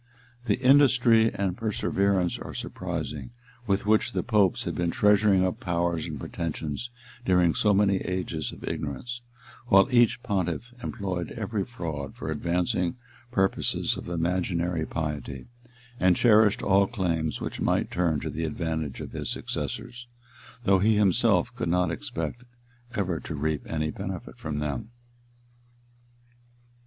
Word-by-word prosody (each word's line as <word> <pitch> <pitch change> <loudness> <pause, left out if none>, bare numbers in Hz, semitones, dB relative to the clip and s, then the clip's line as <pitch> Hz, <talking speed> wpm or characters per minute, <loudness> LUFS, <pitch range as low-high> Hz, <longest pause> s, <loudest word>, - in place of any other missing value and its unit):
{1076.} - - -15 0.2
The - - +3
industry 125 -5 +6
and 95 -3 -1
perseverance 100 -4 0
are - - -8
surprising, - - -4 0.4
with 100 0 +1
which 110 +3 +2
the - - 0
popes 105 -6 +2
had - - -3
been 85 -1 0
treasuring 105 0 +4
up 95 +5 -2
powers 85 -3 -1
and 75 -4 -5
pretensions 80 - -4 0.3
during 90 -5 +4
so 105 - +3
many 100 -1 +4
ages 90 -5 -3
of - - -12
ignorance; 120 - -4 0.5
while 95 -3 +6
each 120 -1 +4
pontiff 100 +2 -2
employed 95 -6 -3
every 110 -3 -2
fraud 80 - -5
for - - -5
advancing 85 0 0 0.4
purposes 95 -4 +1
of - - -7
imaginary 85 -1 0
piety, 75 -5 -4 0.5
and 90 -1 +4
cherished 110 -2 +5
all 100 0 +4
claims 85 - -1
which - - -5
might - - +1
turn 85 -4 +1
to - - -3
the 80 - -3
advantage 80 -3 -3
of - - -7
his - - -4
successors, 125 0 -5 0.6
though 95 -2 +4
he 110 +3 +4
himself 100 -4 +3
could 85 - -2
not 90 +1 +2
expect 120 - -4 0.5
ever 90 -6 -1
to 80 - -6
reap 75 -1 -1
any 75 -1 -1
benefit - - -6
from 75 -1 -4
them. 75 - -3
90 Hz, 140 wpm, -27 LUFS, 80-105 Hz, 0.6 s, industry